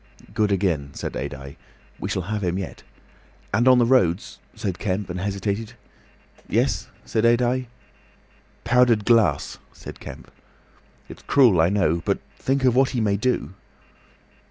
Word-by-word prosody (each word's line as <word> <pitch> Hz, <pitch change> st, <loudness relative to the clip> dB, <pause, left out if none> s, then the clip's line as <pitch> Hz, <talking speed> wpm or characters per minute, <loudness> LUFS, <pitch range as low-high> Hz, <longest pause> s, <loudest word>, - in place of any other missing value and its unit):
"Good 105 Hz, -2 st, +1 dB
again," 85 Hz, -8 st, -1 dB
said -, -, -5 dB
Adye. 70 Hz, 0 st, -6 dB, 0.4 s
"We -, -, -4 dB
shall 95 Hz, -, -2 dB
have 105 Hz, +2 st, -3 dB
him 90 Hz, 0 st, -1 dB
yet!" 95 Hz, -, -6 dB, 0.7 s
"And 120 Hz, +5 st, +3 dB
on 130 Hz, -1 st, +7 dB
the 120 Hz, -, +4 dB
roads," 100 Hz, -8 st, +1 dB, 0.2 s
said 95 Hz, -3 st, -4 dB
Kemp, 95 Hz, -1 st, -2 dB
and 90 Hz, -, -4 dB
hesitated. 100 Hz, +3 st, -3 dB, 0.8 s
"Yes?" -, -, 0 dB, 0.2 s
said 110 Hz, -, -1 dB
Adye. 120 Hz, +2 st, +2 dB, 1.0 s
"Powdered 120 Hz, -3 st, +3 dB
glass," 110 Hz, -, +2 dB
said -, -, -10 dB
Kemp. -, -, -10 dB, 0.8 s
"It's -, -, -11 dB
cruel, 120 Hz, -12 st, +4 dB
I 85 Hz, -, +3 dB
know. 90 Hz, -5 st, +1 dB
But -, -, 0 dB, 0.2 s
think 135 Hz, 0 st, 0 dB
of 125 Hz, -2 st, +3 dB
what 130 Hz, 0 st, +4 dB
he 125 Hz, -, -2 dB
may 105 Hz, -3 st, +1 dB
do!" 100 Hz, -, -1 dB
105 Hz, 145 wpm, -23 LUFS, 90-120 Hz, 1.0 s, on